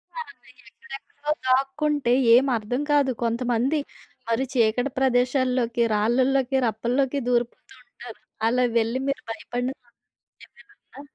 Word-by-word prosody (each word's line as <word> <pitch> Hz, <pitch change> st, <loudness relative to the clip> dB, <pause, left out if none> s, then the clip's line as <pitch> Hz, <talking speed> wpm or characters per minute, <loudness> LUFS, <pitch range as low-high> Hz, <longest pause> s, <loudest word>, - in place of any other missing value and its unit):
ఆ! -, -, -5 dB
ఇంకా -, -, -22 dB
ఎక్కడెక్కడో 290 Hz, -6 st, -7 dB, 0.2 s
దాక్కుంటే 270 Hz, 0 st, +1 dB, 0.2 s
ఏం 260 Hz, -, +5 dB
అర్థం 235 Hz, +5 st, -3 dB
కాదు. 285 Hz, -2 st, +3 dB
కొంతమంది 240 Hz, +5 st, 0 dB, 0.5 s
మరి 230 Hz, +3 st, +1 dB
చీకటి 245 Hz, +2 st, +1 dB
ప్రదేశాల్లోకి, 250 Hz, -2 st, +1 dB
రాళ్ళలోకి, 255 Hz, +5 st, +1 dB
రప్పల్లోకి 250 Hz, +5 st, -1 dB
దూరిపోతూ 240 Hz, -1 st, -2 dB
ఉంటారు. -, -, -13 dB, 0.3 s
అలా 250 Hz, +2 st, +2 dB
వెళ్ళి 230 Hz, +3 st, 0 dB
మీరు 275 Hz, -, -2 dB
భయపడిన 245 Hz, +2 st, -4 dB
సం 240 Hz, -1 st, -31 dB, 0.5 s
ఏమైనుందా? 410 Hz, -9 st, -18 dB
255 Hz, 115 wpm, -24 LUFS, 235-275 Hz, 0.5 s, ఏం